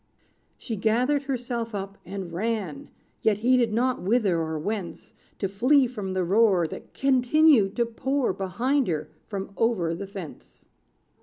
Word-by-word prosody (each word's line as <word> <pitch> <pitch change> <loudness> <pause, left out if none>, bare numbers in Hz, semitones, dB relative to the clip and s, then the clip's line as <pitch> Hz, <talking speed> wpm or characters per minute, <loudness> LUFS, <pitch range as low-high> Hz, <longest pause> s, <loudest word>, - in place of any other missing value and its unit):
She 225 -4 -5
gathered 250 +7 +1
herself 240 -4 -3
up, 195 0 -5
and 190 -3 -6
ran, 195 -6 -3 0.3
Yet 215 -2 +2
heeded 250 -3 +4
not 250 +3 0
whither 195 -3 +2
or 160 0 -3
whence, 195 +2 -5 0.2
To 195 - -1
flee 255 +8 +3
from 210 -6 -5
the 185 -1 0
roar, 195 -1 +3
That 155 - -9
continued 260 -4 +4
to 235 - +2
pour 255 +1 -1
Behind 235 +9 0
her, 155 -4 -2 0.2
from 200 -2 -5
over 195 -8 +1
the 195 +4 -6
fence. 190 -6 -11
220 Hz, 145 wpm, -26 LUFS, 190-245 Hz, 0.3 s, heeded